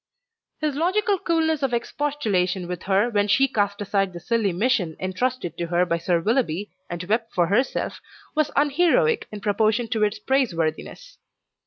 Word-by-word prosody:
His 300 -3 0
logical 390 +6 +1
coolness 320 -3 +1
of 265 -3 +1
expostulation 210 -10 -1
with 180 -1 -5
her 200 +5 +3
when 205 -2 +2
she 270 +7 +4
cast 205 -5 -1
aside 195 -2 0
the 175 - -7
silly 225 +1 0
mission 180 -4 0
entrusted 185 -1 -2
to 170 - -2
her 175 +1 +2
by 170 -1 -1
Sir 170 0 +1
Willoughby 205 - 0 0.2
and 175 0 -4
wept 225 +4 -1
for 175 - +3
herself, 215 +9 -1 0.3
was 310 -1 +1
unheroic 350 - +2
in 210 -1 -7
proportion 215 +3 +1
to 220 - -1
its 210 0 +1
praiseworthiness. 260 - -2
215 Hz, 160 wpm, -24 LUFS, 185-275 Hz, 0.3 s, she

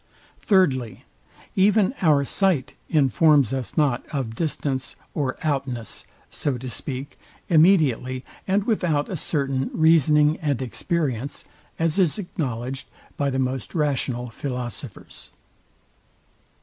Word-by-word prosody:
Thirdly, 135 - +1 0.5
Even 200 +3 +4
our 150 -5 +4
sight 175 -6 +1 0.2
informs 145 -2 +4
us 130 +2 -4
not 145 -6 +2
of 130 -6 -3
distance 135 -1 -2 0.2
or 135 -3 -2
outness 135 -7 -3 0.3
(so 140 -4 -2
to 125 +1 -6
speak) 135 +4 -6 0.3
immediately 155 -7 +3 0.2
and 195 +1 +2
without 175 -10 0
a 190 - -3
certain 135 -4 -1
reasoning 155 -1 +4
and 145 -5 0
experience, 135 0 -2 0.3
as 165 +3 0
is 175 -2 +3
acknowledged 135 - -4 0.3
by 140 -1 0
the 130 - -2
most 130 - -2
rational 130 -5 -1
philosophers. 125 -3 -7
140 Hz, 110 wpm, -24 LUFS, 130-160 Hz, 0.5 s, Even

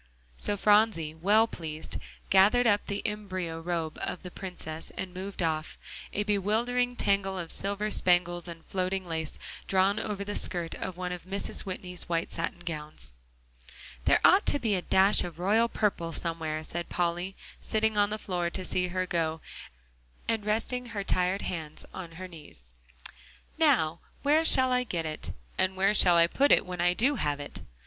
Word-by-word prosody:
So 205 - +1
Phronsie, 205 -7 +3
well 205 +7 +4
pleased, 160 -7 -6 0.3
gathered 205 +6 +6
up 205 -2 +3
the 200 0 -2
embyro 185 -6 -3
robe 165 -2 -3
of - - -3
the 180 - -7
Princess 170 -4 -7
and 185 -1 -4
moved 190 0 -4
off, 155 -1 -1 0.3
a 205 - 0
bewildering 225 +5 +1
tangle 195 -3 +1
of 170 -2 -4
silver 200 +2 -2
spangles 175 -2 +2
and 165 -1 -9
floating 185 0 -2
lace, 160 -2 -3 0.3
drawn 195 +2 +3
over 205 -2 -3
the 205 +1 -4
skirt 175 -4 -1
of 185 -2 -5
one 180 0 -3
of 180 -1 -6
Mrs. 195 +1 -1
Whitney's 180 -2 -4
white 165 -1 -1
satin 170 +1 -3
gowns. 150 - -5 0.9
"There - - +5
ought - - +6
to - - +4
be 230 -6 0
a 185 - +1
dash 190 +3 +4
of 175 -3 -7
royal 215 +6 +3
purple 195 -8 0
somewhere," 160 -2 -2
said 175 +2 -5
Polly, 175 +2 -1 0.3
sitting 220 0 0
on 205 -1 +3
the 215 - -2
floor 180 -4 -2
to 185 +1 -3
see 180 0 +1
her 185 +1 -1
go, 160 -2 -1 0.9
and 225 -2 +1
resting 230 +4 0
her 210 -4 -4
tired 185 +1 +1
hands 160 -4 -4
on 170 -3 -7
her 185 +3 -7
knees. 145 - -10 0.9
"Now 220 - +3 0.2
where 300 +3 +4
shall 260 -5 +4
I 250 0 +2
get 175 -8 -3
it, 155 -1 -4 0.3
and 185 0 +2
where 195 +2 +3
shall 180 -4 +5
I 170 - +7
put 275 +11 +2
it - - +6
when 180 -1 -4
I 175 0 +3
do 270 +6 +2
have 145 -6 -1
it?" 145 - -6
185 Hz, 175 wpm, -29 LUFS, 170-205 Hz, 0.9 s, I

